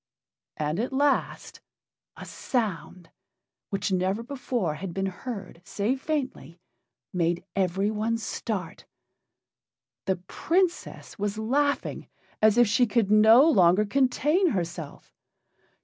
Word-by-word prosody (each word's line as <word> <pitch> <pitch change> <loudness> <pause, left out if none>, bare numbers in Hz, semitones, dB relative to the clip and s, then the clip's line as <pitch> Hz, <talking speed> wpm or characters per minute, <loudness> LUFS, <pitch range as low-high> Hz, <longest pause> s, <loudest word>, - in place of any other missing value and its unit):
And 155 +4 -2
at 245 +4 -2
last 280 +1 -1 0.6
a - - -9
sound 185 -7 -4 0.6
which 195 0 -2
never 190 +4 0
before 245 - -2
had 175 +2 -7
been 195 0 -1
heard, 195 -2 -7
save 225 +9 -2
faintly 260 - -4 0.5
made 175 -1 0
everyone 205 +4 0
start. 210 -5 -5 1.2
The 190 - +1
Princess 335 - -2
was 205 +1 -2
laughing 280 +6 -1 0.3
as 215 +1 +4
if 240 - +7
she 230 +4 +3
could 210 -2 +1
no 220 +7 +7
longer 190 - +4
contain 275 - +2
herself. 170 - -5
210 Hz, 105 wpm, -26 LUFS, 185-250 Hz, 1.2 s, if